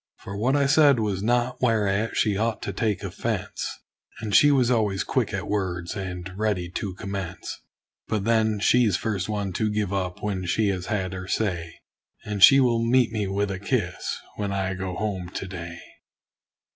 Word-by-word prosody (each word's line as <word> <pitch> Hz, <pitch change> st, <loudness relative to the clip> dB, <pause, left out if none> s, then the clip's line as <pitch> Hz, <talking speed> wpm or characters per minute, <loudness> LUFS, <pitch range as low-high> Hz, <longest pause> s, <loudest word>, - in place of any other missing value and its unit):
For 100 Hz, -, -8 dB
what 125 Hz, +7 st, +1 dB
I 140 Hz, -1 st, +3 dB
said 145 Hz, -2 st, +5 dB
was 100 Hz, -3 st, -1 dB
naught 120 Hz, +3 st, 0 dB
whereat 110 Hz, -3 st, +1 dB
she 105 Hz, -3 st, +2 dB
ought 110 Hz, +2 st, -1 dB
to 100 Hz, -, -3 dB
take 105 Hz, 0 st, -1 dB
offense; -, -, -3 dB, 0.5 s
And 110 Hz, -2 st, -4 dB
she 145 Hz, -, +7 dB
was 130 Hz, -4 st, +3 dB
always 105 Hz, -5 st, +1 dB
quick -, -, 0 dB
at -, -, -3 dB
words 90 Hz, -3 st, -2 dB
and 90 Hz, -2 st, -5 dB
ready 95 Hz, -5 st, -1 dB
to 95 Hz, -1 st, -4 dB
commence. 100 Hz, -3 st, -6 dB, 0.5 s
But 105 Hz, -3 st, -1 dB
then 110 Hz, -1 st, +2 dB
she's 110 Hz, -3 st, +4 dB
first 100 Hz, 0 st, -2 dB
one 100 Hz, -3 st, -2 dB
to 110 Hz, +4 st, 0 dB
give 105 Hz, -2 st, -1 dB
up 90 Hz, -2 st, -3 dB
when 95 Hz, -3 st, -2 dB
she 105 Hz, +4 st, +2 dB
has 95 Hz, -2 st, -3 dB
had 95 Hz, -5 st, -1 dB
her 95 Hz, 0 st, -6 dB
say; 90 Hz, -6 st, -2 dB, 0.4 s
And 105 Hz, -1 st, -4 dB
she 135 Hz, +6 st, +10 dB
will 120 Hz, -3 st, +3 dB
meet 120 Hz, 0 st, +3 dB
me 105 Hz, -3 st, -1 dB
with 100 Hz, +1 st, -1 dB
a 95 Hz, -, -4 dB
kiss, 100 Hz, -4 st, -2 dB, 0.2 s
when 100 Hz, -1 st, -2 dB
I 95 Hz, -1 st, -1 dB
go 95 Hz, -1 st, -4 dB
home 95 Hz, -4 st, -3 dB
to 95 Hz, -, -4 dB
day. 85 Hz, -2 st, -7 dB
100 Hz, 185 wpm, -25 LUFS, 95-110 Hz, 0.5 s, she